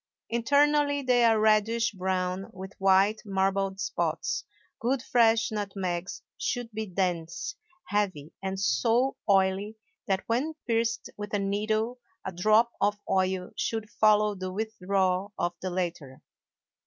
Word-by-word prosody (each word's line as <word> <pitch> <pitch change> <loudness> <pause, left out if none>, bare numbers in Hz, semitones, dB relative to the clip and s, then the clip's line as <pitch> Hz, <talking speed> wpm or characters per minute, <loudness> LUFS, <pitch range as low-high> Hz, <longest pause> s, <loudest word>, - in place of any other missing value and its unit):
Internally 285 +4 +3
they 250 -2 +3
are 225 -2 +5
reddish 220 +2 +3
brown, 185 -1 -2
with 190 +1 -8
white 195 +2 +4
marbled 195 -1 0
spots. 185 - -1 0.4
Good 250 +2 0
fresh 230 -1 +3
nutmegs 195 -4 -3 0.2
should 245 -2 -2
be 220 0 -4
dense, 180 - -2 0.3
heavy, 185 -8 -1
and 190 0 -3
so 225 - +2
oily 195 +2 +2 0.3
that 190 -1 0
when 270 +8 -1
pierced 230 0 0
with 205 0 -4
a - - +3
needle 215 +4 -1 0.3
a 190 - -3
drop 215 +6 +3
of 205 +1 +2
oil 185 -1 0
should 220 -1 -3
follow 210 -1 +4
the 185 -1 -5
withdrawal 195 -2 -1
of 175 - -1
the 185 - -2
latter. 170 -7 -4
205 Hz, 130 wpm, -28 LUFS, 190-230 Hz, 0.4 s, are